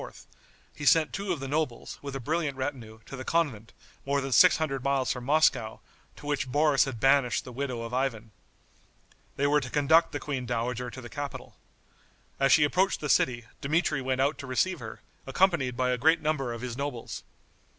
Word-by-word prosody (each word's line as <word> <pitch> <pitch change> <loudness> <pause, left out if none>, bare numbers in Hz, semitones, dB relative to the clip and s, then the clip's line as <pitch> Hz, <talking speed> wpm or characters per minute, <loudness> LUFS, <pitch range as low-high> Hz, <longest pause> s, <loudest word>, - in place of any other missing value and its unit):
he 150 - -8
sent 155 +1 +4
two 200 0 -3
of 170 - -1
the 135 - -5
nobles, 145 -3 -3
with 140 -1 -6
a - - -3
brilliant 150 +1 -2
retinue, 130 -5 -5
to - - -8
the 130 - -6
convent, 130 -10 -1 0.3
more 140 +1 0
than 135 0 -4
six 180 +7 +6
hundred 135 -5 -2
miles 140 -1 +1
from 125 - -4
Moscow, 130 -5 +2 0.4
to - - -13
which 135 -3 -2
Boris 145 0 +3
had 130 -5 -6
banished 135 0 +3
the 125 - -8
widow 125 -2 -4
of 115 +1 -7
Ivan. 120 -4 -2 1.0
They 140 - 0
were 145 +1 +4
to 125 - -6
conduct 160 +4 +3
the 145 - -4
queen 130 -4 -4
dowager 125 +1 -2
to 130 - -9
the 120 - -9
capital. 145 +1 -7 0.8
As 135 -1 +3
she 150 +2 +6
approached 185 +6 +1
the 150 - -4
city, 120 -3 +2 0.2
Dmitri 150 0 0
went 130 0 -1
out 140 +3 +1
to 140 - -7
receive 175 +7 0
her, - - -9 0.3
accompanied 135 -5 +1
by 125 0 +1
a 125 - -1
great 160 +5 +4
number 150 -5 -1
of 115 -1 -6
his 125 -2 -5
nobles. 135 -3 -5
135 Hz, 195 wpm, -28 LUFS, 125-150 Hz, 1.0 s, six